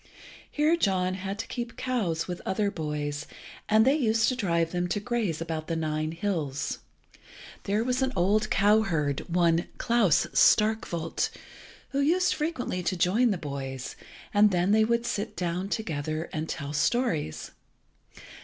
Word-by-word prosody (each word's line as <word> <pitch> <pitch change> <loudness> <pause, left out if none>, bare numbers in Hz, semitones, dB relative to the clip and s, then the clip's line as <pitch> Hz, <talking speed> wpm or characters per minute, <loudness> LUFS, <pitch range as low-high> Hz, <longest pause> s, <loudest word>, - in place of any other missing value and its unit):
Here 305 +2 +2
John 185 - +1
had 195 +1 -4
to - - -4
keep 240 -1 -6
cows 205 -11 -1
with 180 -1 -5
other 200 +1 0
boys, 150 -2 -4 0.4
and 220 +1 +5
they 270 - +5
used 225 -5 +2
to 255 - -1
drive 170 -8 0
them 180 0 -1
to 205 - -1
graze 210 -7 -1
about 160 -1 -4
the 165 - -1
Nine 155 -1 -1
hills. 165 -6 -2 0.9
There 210 +2 +1
was 250 +1 0
an 260 0 +1
old 205 +4 +2
cowherd, 195 -9 +2
one 170 -1 +2
Klas 230 -9 +3
Starkwolt 210 -6 +2 0.6
who 275 - -2
used 350 +6 +3
frequently 300 - -2
to 180 +1 -1
join 205 +9 +3
the 200 - 0
boys, 135 -4 -5 0.4
and 210 0 +6
then 180 0 +1
they 220 +1 +5
would 235 +1 +1
sit 210 -1 -3
down 180 +2 -2
together 155 -6 -3
and 155 0 -3
tell 140 0 -4
stories. 160 - 0
190 Hz, 150 wpm, -27 LUFS, 160-225 Hz, 0.9 s, and